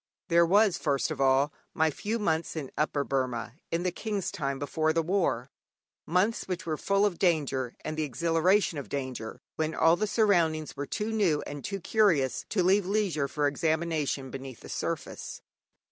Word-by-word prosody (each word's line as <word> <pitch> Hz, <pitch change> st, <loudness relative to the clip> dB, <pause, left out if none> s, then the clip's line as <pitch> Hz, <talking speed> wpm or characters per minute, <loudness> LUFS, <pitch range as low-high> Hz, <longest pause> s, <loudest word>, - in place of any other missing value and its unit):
There 170 Hz, 0 st, +5 dB
was, 200 Hz, +1 st, +4 dB
first 140 Hz, 0 st, 0 dB
of 140 Hz, -3 st, -3 dB
all, 135 Hz, +2 st, +3 dB, 0.2 s
my 160 Hz, -1 st, +3 dB
few 215 Hz, +9 st, -2 dB
months 165 Hz, -7 st, -1 dB
in 145 Hz, -5 st, -5 dB
Upper 145 Hz, -1 st, 0 dB
Burma 125 Hz, -4 st, -2 dB, 0.2 s
in 165 Hz, +1 st, -1 dB
the 180 Hz, -, 0 dB
King's 205 Hz, +1 st, -3 dB
time 140 Hz, -8 st, -2 dB
before 155 Hz, +3 st, 0 dB
the 165 Hz, 0 st, +1 dB
war, 160 Hz, -8 st, 0 dB, 0.6 s
months 185 Hz, +7 st, +1 dB
which 185 Hz, -1 st, -3 dB
were 160 Hz, -2 st, -1 dB
full 200 Hz, +5 st, +2 dB
of 185 Hz, -5 st, -1 dB
danger 140 Hz, -8 st, +1 dB
and 155 Hz, -, -3 dB
the 155 Hz, -, -1 dB
exhilaration 165 Hz, -, +2 dB
of 140 Hz, -, -8 dB
danger, 130 Hz, -3 st, -5 dB, 0.2 s
when 160 Hz, 0 st, -1 dB
all 165 Hz, +1 st, +5 dB
the 215 Hz, +4 st, -1 dB
surroundings 170 Hz, -, +2 dB
were 145 Hz, -, -4 dB
too 215 Hz, +1 st, -2 dB
new 190 Hz, -9 st, +2 dB
and 145 Hz, -1 st, -7 dB
too 195 Hz, 0 st, -3 dB
curious 170 Hz, -, +2 dB
to 190 Hz, -4 st, +1 dB
leave 190 Hz, +1 st, +3 dB
leisure 190 Hz, -9 st, +1 dB
for 145 Hz, +1 st, -1 dB
examination 155 Hz, -2 st, 0 dB
beneath 135 Hz, -2 st, -8 dB
the -, -, -11 dB
surface. -, -, -4 dB
160 Hz, 175 wpm, -29 LUFS, 140-185 Hz, 0.6 s, There